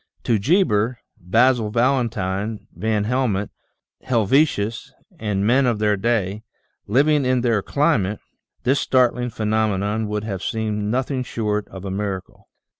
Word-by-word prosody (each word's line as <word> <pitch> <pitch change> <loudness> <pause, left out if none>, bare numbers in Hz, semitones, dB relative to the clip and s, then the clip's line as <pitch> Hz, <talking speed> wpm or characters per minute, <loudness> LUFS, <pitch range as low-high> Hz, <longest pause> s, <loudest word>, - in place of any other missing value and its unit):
To 115 -3 +1
Geber, 120 - +2 0.2
Basil 115 +4 +2
Valentine, 110 -4 0
Van 110 -1 -1
Helmont, 110 -4 0 0.5
Helvetius, 120 0 +1 0.3
and 100 -4 -1
men 130 +4 +3
of 120 -3 +1
their 105 0 +2
day, 100 -1 -1 0.5
living 145 +6 +3
in 125 -1 +2
their 115 -4 +1
climate, 110 - +1 0.4
this 135 +2 +2
startling 125 -1 +2
phenomenon 110 -1 0
would 105 0 -3
have 100 -4 -4
seemed 105 -1 -2
nothing 130 +4 -1
short 105 -4 -2
of 95 0 -10
a 95 - -3
miracle. 95 -2 -5
110 Hz, 125 wpm, -22 LUFS, 105-125 Hz, 0.5 s, men